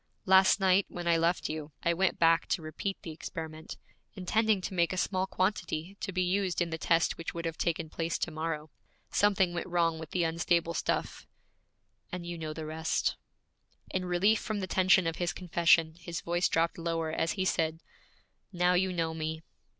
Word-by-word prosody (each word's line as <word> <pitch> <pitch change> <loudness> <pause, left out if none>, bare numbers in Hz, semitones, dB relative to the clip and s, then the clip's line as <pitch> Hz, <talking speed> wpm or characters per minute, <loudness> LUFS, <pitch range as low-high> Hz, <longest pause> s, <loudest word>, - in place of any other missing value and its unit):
Last 190 +1 +6
night, 190 0 +3
when 175 -1 -6
I 170 - +4
left 165 +2 +1
you, 155 -1 -6
I 170 - +3
went 190 +2 +1
back 165 0 +4
to 170 - -1
repeat 190 +5 -4
the 165 - -6
experiment, 160 0 -7 0.4
intending 215 +3 +2
to 190 - -5
make 170 -2 +2
a - - -4
small 185 +1 0
quantity 185 -2 -2
to 200 - -4
be 185 0 0
used 185 0 0
in 170 -1 0
the 160 - -3
test 165 0 +2
which 165 - -5
would 170 0 -4
have 165 -1 -2
taken 165 -1 -1
place 165 +1 -2
to 170 - -2
morrow. 155 -1 -4 0.4
Something 195 -3 +3
went 175 - -3
wrong 170 -2 +1
with 160 -2 -8
the 180 - 0
unstable 170 +1 +1
stuff, - - -2 0.8
and 180 -1 -5
you 175 0 -4
know 160 -2 -5
the 155 0 -6
rest.' 160 +1 -1 0.8
In 185 -1 -1
relief 190 +5 +3
from 215 -2 -3
the 190 - -2
tension 185 0 +4
of 165 0 -2
his 175 -1 -1
confession, 170 -2 +3
his 170 -1 -5
voice 175 +1 +1
dropped 165 +1 +1
lower 165 -1 -1
as 165 +1 0
he 190 -2 -1
said, 160 -3 0 0.7
'Now 180 -1 +2
you 185 +1 +2
know 165 -2 -1
me!' 160 0 -4
170 Hz, 190 wpm, -30 LUFS, 165-185 Hz, 0.8 s, Last